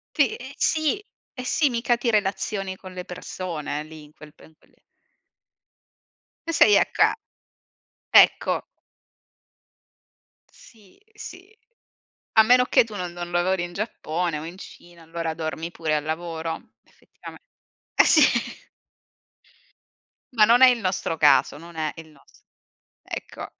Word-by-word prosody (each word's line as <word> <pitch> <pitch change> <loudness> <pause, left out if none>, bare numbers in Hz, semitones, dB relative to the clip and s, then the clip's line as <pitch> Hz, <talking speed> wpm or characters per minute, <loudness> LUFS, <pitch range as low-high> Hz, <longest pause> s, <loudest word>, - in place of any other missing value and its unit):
Sì, 285 -7 +2
ehm, 260 +1 -9
sì, 315 +4 +1 0.4
eh 255 -2 -7
sì, 290 +2 +1
mica 240 0 0
ti 240 0 -1
relazioni 195 -1 -1
con 185 0 -12
le 180 0 -7
persone 165 -5 -6
lì 155 0 -12
in 150 0 -17
quel 150 -1 -15
pen 160 - -19
quelle - - -30 1.7
E - - 0
sei 210 - +7
a - - +2
ca - - +5 1.2
ecco. - - -4 1.9
Sì, 215 - -20
sì. 400 0 -11 0.8
A 220 - +7
meno 250 +3 +5
che - - +4
tu 220 -2 -11
non 180 -3 -4
non 175 0 -7
lavori 175 +1 0
in 175 0 -7
Giappone 175 -5 -3
o 155 - -8
in 170 +3 -9
Cina, 175 -3 -14
allora, 165 0 -4
dormi 160 +1 -5
pure 160 -2 -2
al 150 - -1
lavoro. 165 +1 -5
effettivame - - -15 0.6
Eh - - +6
sì. - - +5 2.1
Ma 220 -3 +5
non 235 +4 +5
è 260 - +10
il 245 -2 +2
nostro 185 -4 -2
caso, 150 -1 +4
non 170 +2 -13
è 155 -2 -2
il 165 -1 -11
nos 150 -2 -24 0.6
ecco, - - -8
180 Hz, 135 wpm, -24 LUFS, 160-230 Hz, 2.1 s, è